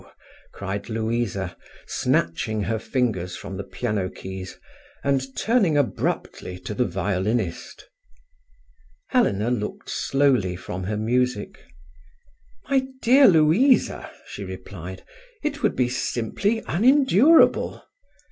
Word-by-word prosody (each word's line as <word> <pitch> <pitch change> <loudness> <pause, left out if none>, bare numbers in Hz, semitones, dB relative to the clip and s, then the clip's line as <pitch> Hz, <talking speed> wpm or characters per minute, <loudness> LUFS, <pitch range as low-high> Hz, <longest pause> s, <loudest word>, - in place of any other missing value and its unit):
cried 100 +2 -5
Louisa, 110 -4 -2 0.3
snatching 105 +6 0
her 110 +2 -1
fingers 105 -8 -1
from 95 +1 -7
the 100 - -4
piano 105 -2 -2
keys, 95 0 -8 0.5
and 135 -1 0
turning 210 - +2
abruptly 115 -8 -2
to 90 +3 -6
the 125 +4 +1
violinist. 95 +1 -2 1.2
Helena 120 - +2
looked 105 -4 -4
slowly 130 -10 +1
from 90 +1 -6
her 105 +2 -2
music. 120 0 -1 1.1
"My 265 -1 +1 0.2
dear 265 +4 +7
Louisa," 180 - +3 0.2
she - - -8
replied, - - -8 0.4
"it 295 -1 -2
would - - +1
be 125 - +2
simply 125 - -1
unendurable." 265 - +4
120 Hz, 100 wpm, -24 LUFS, 100-165 Hz, 1.2 s, dear